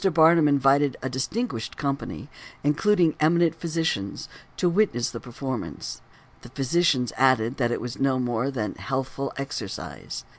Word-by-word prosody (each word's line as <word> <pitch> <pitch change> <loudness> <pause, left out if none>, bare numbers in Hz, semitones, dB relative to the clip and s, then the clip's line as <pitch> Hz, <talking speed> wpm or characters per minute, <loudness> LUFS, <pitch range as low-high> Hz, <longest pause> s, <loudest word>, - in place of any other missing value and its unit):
Barnum 160 -1 +6
invited 140 0 +3
a 130 - -1
distinguished 130 - -3
company, 140 -1 -3 0.4
including 165 +3 +3
eminent 165 +1 +4
physicians, 160 - -2 0.3
to 180 - +2
witness 170 - +1
the - - -6
performance; 130 0 -5 0.4
the 120 - -12
physicians 135 -1 +1
added 130 -1 +3
that 120 -3 +1
it 120 - -1
was 120 +1 -6
no 135 -1 +2
more 125 0 0
than 115 -6 -3
healthful 135 0 -3
exercise. 135 -8 -6
135 Hz, 135 wpm, -25 LUFS, 125-160 Hz, 0.4 s, Barnum